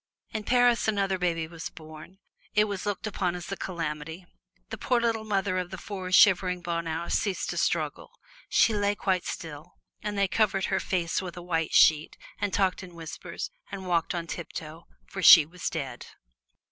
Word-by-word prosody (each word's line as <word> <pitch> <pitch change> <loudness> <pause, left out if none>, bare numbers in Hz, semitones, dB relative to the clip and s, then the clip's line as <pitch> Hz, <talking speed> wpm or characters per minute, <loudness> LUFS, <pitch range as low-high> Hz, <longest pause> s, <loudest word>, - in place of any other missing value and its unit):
In 215 -1 -4
Paris 245 -1 +3
another 195 -3 0
baby 165 -2 0
was 165 0 -7
born 155 +3 -12 0.4
it 210 - +6
was 205 -1 -4
looked 205 0 -2
upon 185 -4 -1
as 175 +1 -7
a - - -1
calamity. 165 -1 -5 0.5
The - - -4
poor 250 -2 +2
little 230 -2 0
mother 195 -3 0
of 180 -1 -4
the 190 - -7
four 190 0 -7
little 185 - -4
shivering 180 -2 +5
Bonheurs 170 -1 -2
ceased 200 -3 -1
to - - -5
struggle. - - -1 0.4
She 225 - +4
lay 205 0 +1
quite 185 -3 0
still, 150 -2 -7 0.3
and 210 -1 -4
they 200 0 +3
covered 195 -1 +1
her - - +2
face 175 -2 -1
with 180 -2 -7
a 175 - -7
white 165 -2 -1
sheet 155 -1 +5 0.2
and 205 - -1
talked 190 0 +1
in 180 -2 -11
whispers, 165 - -7 0.2
and 190 - -6
walked 170 0 0
on 170 -1 -3
tiptoe, 165 -1 -7 0.2
for 195 - -7
she 165 -2 +10
was 175 +3 -5
dead. 140 -5 -5
180 Hz, 185 wpm, -27 LUFS, 165-200 Hz, 0.5 s, she